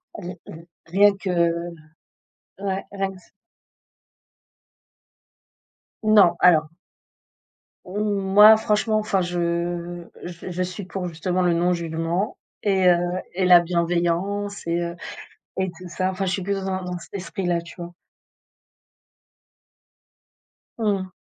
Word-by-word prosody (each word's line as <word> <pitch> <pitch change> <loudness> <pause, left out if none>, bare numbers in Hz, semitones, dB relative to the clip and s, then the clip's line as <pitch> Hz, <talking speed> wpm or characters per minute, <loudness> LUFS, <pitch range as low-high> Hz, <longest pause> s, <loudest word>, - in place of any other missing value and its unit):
Ri 180 -2 -7
ri 165 +1 -11 0.2
rien 200 +5 +5
que 195 - -5 1.3
ouais. 195 -1 -2
Rien 195 -1 -2
que 190 - -13
ç 170 - -21 2.7
Non, 205 -5 +6
alors 160 -4 +5 1.2
Mmh, 180 - -11
moi, 205 +1 +6
franchement, 215 0 +1
enfin 200 -3 0
je 175 0 -2 0.2
j 175 +1 -7
je 180 +1 -1
suis 185 +2 -6
pour, 185 -1 -4
justement, 180 +2 -2
le 175 -1 +3
non 175 +2 +2
jugement 170 +3 -2 0.2
et 190 -3 +3
heu, 175 - +5 0.4
et 185 0 0
la 175 -1 +8
bienveillance 175 +3 -1
et 170 +1 0
heu, 170 0 -4 0.6
et 190 0 0
tout 180 0 -11
ça. 185 +2 -1
Enfin, 190 +1 -3
je 185 - -1
suis 190 - -1
plutôt 195 +1 -2
dans 185 -1 -3
un 180 - -3
cet 170 - -14
esprit-là, 180 -2 -2
tu 170 - -13
vois? 175 0 -8 2.8
Mmh. 200 -4 -1
180 Hz, 125 wpm, -23 LUFS, 170-195 Hz, 2.8 s, la